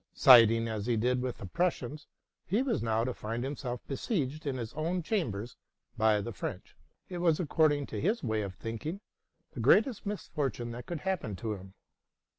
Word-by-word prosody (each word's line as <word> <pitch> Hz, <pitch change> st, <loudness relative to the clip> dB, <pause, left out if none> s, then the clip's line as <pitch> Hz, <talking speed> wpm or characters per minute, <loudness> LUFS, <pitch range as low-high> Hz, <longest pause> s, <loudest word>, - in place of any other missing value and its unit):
Siding 115 Hz, -4 st, +7 dB
as 110 Hz, -1 st, -3 dB
he 120 Hz, -2 st, +2 dB
did 125 Hz, +3 st, +1 dB
with 125 Hz, -1 st, -3 dB
the -, -, -8 dB
Prussians, 150 Hz, -, -2 dB, 0.4 s
he 215 Hz, +8 st, +2 dB
was 255 Hz, -5 st, 0 dB
now 115 Hz, 0 st, +1 dB
to 125 Hz, +1 st, -1 dB
find 115 Hz, +2 st, -4 dB
himself 130 Hz, -3 st, -4 dB
besieged 150 Hz, -, -2 dB
in 135 Hz, -2 st, -1 dB
his 115 Hz, -1 st, -5 dB
own 165 Hz, +4 st, -1 dB
chambers 120 Hz, -, -2 dB, 0.4 s
by 110 Hz, -1 st, +3 dB
the 115 Hz, +3 st, -5 dB
French: -, -, -6 dB, 0.3 s
it 180 Hz, -2 st, -5 dB
was, 165 Hz, -3 st, +3 dB
according 155 Hz, -3 st, +2 dB
to -, -, -5 dB
his 210 Hz, +9 st, +1 dB
way 110 Hz, -3 st, 0 dB
of 100 Hz, -3 st, -5 dB
thinking, 115 Hz, -, -5 dB, 0.5 s
the -, -, -8 dB
greatest 220 Hz, -1 st, +3 dB
misfortune 140 Hz, -, -3 dB
that 120 Hz, +1 st, -8 dB
could 170 Hz, -4 st, -4 dB
happen 175 Hz, -, -2 dB
to 110 Hz, +2 st, -3 dB
him. 95 Hz, -1 st, -10 dB
130 Hz, 180 wpm, -31 LUFS, 115-165 Hz, 0.5 s, Siding